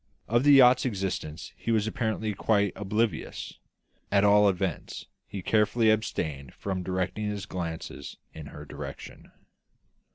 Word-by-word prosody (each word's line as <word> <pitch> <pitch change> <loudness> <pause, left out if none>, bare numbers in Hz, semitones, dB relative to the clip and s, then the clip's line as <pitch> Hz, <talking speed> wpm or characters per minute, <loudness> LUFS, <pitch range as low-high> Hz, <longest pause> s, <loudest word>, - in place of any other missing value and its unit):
Of 120 +3 +2
the 145 0 +7
yacht's 125 -2 +7
existence 95 - -3
he - - -6
was 110 -2 +2
apparently 110 -1 -2
quite 100 0 +1
oblivious; 105 -2 -2 0.5
at 100 0 +4
all 105 0 +6
events, 95 -4 -3 0.2
he 100 -3 -6
carefully 110 +2 +3
abstained 75 -10 -2
from 95 -2 -3
directing 95 +4 -2
his 100 -1 -4
glances 85 -4 -6 0.2
in 80 -2 -9
her 75 +1 -10
direction. - - -9
100 Hz, 130 wpm, -28 LUFS, 90-110 Hz, 0.5 s, the